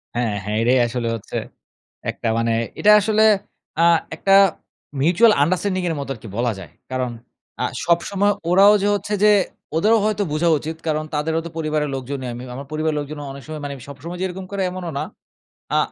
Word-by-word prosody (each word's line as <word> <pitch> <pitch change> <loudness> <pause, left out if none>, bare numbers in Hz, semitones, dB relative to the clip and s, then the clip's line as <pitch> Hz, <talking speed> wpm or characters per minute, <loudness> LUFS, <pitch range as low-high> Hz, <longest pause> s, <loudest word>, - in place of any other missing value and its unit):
হ্যাঁ, 115 -3 0
হ্যাঁ, 105 +2 -2
এটাই 125 +3 +3
আসলে 120 0 -3
হচ্ছে 110 - -6 0.7
একটা - - -5
মানে 115 0 +1 0.3
এটা 210 - +6
আসলে 215 +1 +2 0.6
আ - - +5 0.3
একটা 195 +5 +2 0.7
mutual 180 +10 +5
understanding 185 +3 0
এর 165 - -1
মতো 140 -1 -5
আরকি 115 0 -12
বলা 120 0 +1
যায়। 85 -6 -11 0.2
কারণ 130 -1 -1 0.5
আ - - +2 0.2
সবসময় 195 +4 +2 0.2
ওরাও 195 +3 +7
যে - - +2
হচ্ছে 205 +1 -4
যে, 210 - +7 0.5
ওদেরও 215 +7 +4
হয়তো 210 -1 +1
বুঝা 160 +3 +2
উচিত, 160 +3 -6
কারণ 155 0 0
তাদেরও 160 +2 0
তো - - -5
পরিবারের 155 -2 -1
লোকজনই 130 0 -5
আমি। 120 +1 -7
আমার 140 +2 -7
পরিবারের 155 0 -1
লোকজনও 145 0 -6
অনেক 140 0 -10
সময় 155 -1 -6
মানে, 140 - -4
সবসময় 145 +6 -8
যে - - +1
এরকম 185 +1 -7
করে 200 -1 -2
এমনও 180 -2 -5
না। - - -1 0.7
আ - - +4
155 Hz, 180 wpm, -21 LUFS, 130-185 Hz, 0.7 s, ওরাও